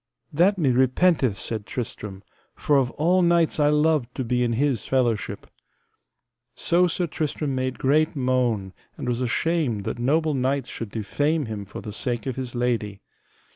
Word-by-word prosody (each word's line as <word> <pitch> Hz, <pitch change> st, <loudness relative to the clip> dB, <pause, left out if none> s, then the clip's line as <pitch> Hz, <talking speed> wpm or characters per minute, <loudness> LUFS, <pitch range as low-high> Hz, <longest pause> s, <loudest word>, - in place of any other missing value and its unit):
That 185 Hz, +6 st, +3 dB
me 145 Hz, -7 st, +2 dB
repenteth, 130 Hz, -, +3 dB
said 110 Hz, 0 st, -4 dB
Tristram, 105 Hz, -5 st, -6 dB, 0.3 s
for 145 Hz, -, +1 dB
of 130 Hz, -3 st, +2 dB
all 175 Hz, +5 st, +2 dB
knights 170 Hz, -2 st, +2 dB
I 145 Hz, 0 st, +4 dB
loved 150 Hz, -4 st, +1 dB
to 130 Hz, -, -2 dB
be 125 Hz, +1 st, 0 dB
in 120 Hz, -1 st, 0 dB
his 130 Hz, -2 st, 0 dB
fellowship. 120 Hz, -5 st, -1 dB, 1.1 s
So 180 Hz, +1 st, +2 dB
Sir 175 Hz, +1 st, -1 dB
Tristram 150 Hz, -2 st, -2 dB
made 130 Hz, 0 st, -2 dB
great 155 Hz, +4 st, +2 dB
moan 125 Hz, -7 st, 0 dB, 0.2 s
and -, -, -5 dB
was 120 Hz, 0 st, -1 dB
ashamed 125 Hz, -3 st, 0 dB
that 115 Hz, -, -4 dB
noble 155 Hz, +5 st, +1 dB
knights 135 Hz, 0 st, -1 dB
should 115 Hz, -, -6 dB
defame 145 Hz, +9 st, -1 dB
him 105 Hz, -3 st, -5 dB
for 100 Hz, -, -8 dB
the 105 Hz, -, -7 dB
sake 120 Hz, +1 st, -3 dB
of 130 Hz, -3 st, -3 dB
his 130 Hz, -2 st, -5 dB
lady. 115 Hz, -5 st, -1 dB
130 Hz, 165 wpm, -24 LUFS, 120-155 Hz, 1.1 s, I